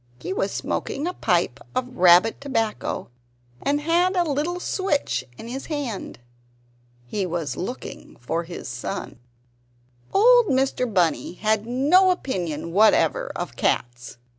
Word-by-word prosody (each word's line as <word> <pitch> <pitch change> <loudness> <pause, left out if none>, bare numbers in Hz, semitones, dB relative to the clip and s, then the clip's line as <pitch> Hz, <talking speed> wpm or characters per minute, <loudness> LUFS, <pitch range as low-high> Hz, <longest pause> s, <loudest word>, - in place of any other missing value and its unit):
He - - -4
was - - -1
smoking 285 - -3
a 360 - -2
pipe - - 0 0.2
of 250 0 -2
rabbit 180 +6 +5
tobacco, 225 -6 -2 0.5
and 290 +1 0
had 345 +4 +2
a 355 - +3
little 315 +3 -1
switch 290 - -1
in 225 - -9
his 265 +3 -6
hand. 280 - -4 0.9
He 195 +11 -2
was 165 -6 -3
looking 215 - -7
for 125 +8 -2
his 170 -4 -8
son. 120 -1 -5 0.9
Old 485 +2 +6
Mr. 260 -3 +1
Bunny 175 -4 +1
had 215 +3 0
no 295 +10 +4
opinion 175 - -2
whatever 220 - +3
of - - -5
cats. 120 0 -2
250 Hz, 130 wpm, -24 LUFS, -, 0.9 s, Old